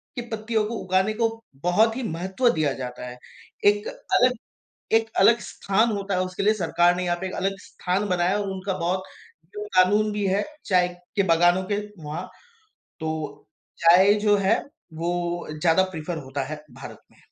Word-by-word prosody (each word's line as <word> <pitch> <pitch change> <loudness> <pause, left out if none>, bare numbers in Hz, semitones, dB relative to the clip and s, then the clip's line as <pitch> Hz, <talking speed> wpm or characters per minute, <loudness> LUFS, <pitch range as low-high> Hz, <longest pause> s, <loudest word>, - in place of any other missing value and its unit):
की 245 - -3
पत्तियों 220 0 -1
को 230 +2 -4
उगाने 190 +3 +1
को 225 +1 +2 0.4
बहुत 220 +6 +3
ही 260 - -3
महत्व 190 +5 0
दिया 155 -4 +1
जाता 125 -1 -6
है। 125 0 -8 0.5
एक 205 +1 +4
अलग 250 0 +2 0.6
एक 225 0 +1
अलग 235 +4 +6
स्थान 210 +2 0
होता 200 0 -2
है 185 - +1
उसके 185 +1 -5
लिए 215 +2 +4
सरकार 175 -3 +2
ने 180 - -2
यहाँ 175 -1 0
पे 190 - -3
एक - - -7
अलग 195 0 -1
स्थान 190 +3 -2
बनाया 180 0 +1
है 205 - +1
और 200 - -4
उनका 190 0 -3
बहुत 180 +2 -1 0.6
क़ानून 210 +1 +3
भी 205 -1 -1
है 195 +2 +1 0.2
चाय 180 -2 +3 0.3
के 200 - +4
बागानों 175 +2 +4
के - - +2 0.3
वहाँ, 155 +5 -5 0.7
तो 160 -1 -5 0.3
चाय 180 +4 +6
जो 205 -1 +5
है 195 0 +2 0.3
वो 175 +1 -2
ज़्यादा 170 +2 +4
प्रेफर 165 0 -5
होता 135 +1 -3
है 150 +1 -7
भारत - - -10
में। - - -25
185 Hz, 175 wpm, -24 LUFS, 175-210 Hz, 0.7 s, अलग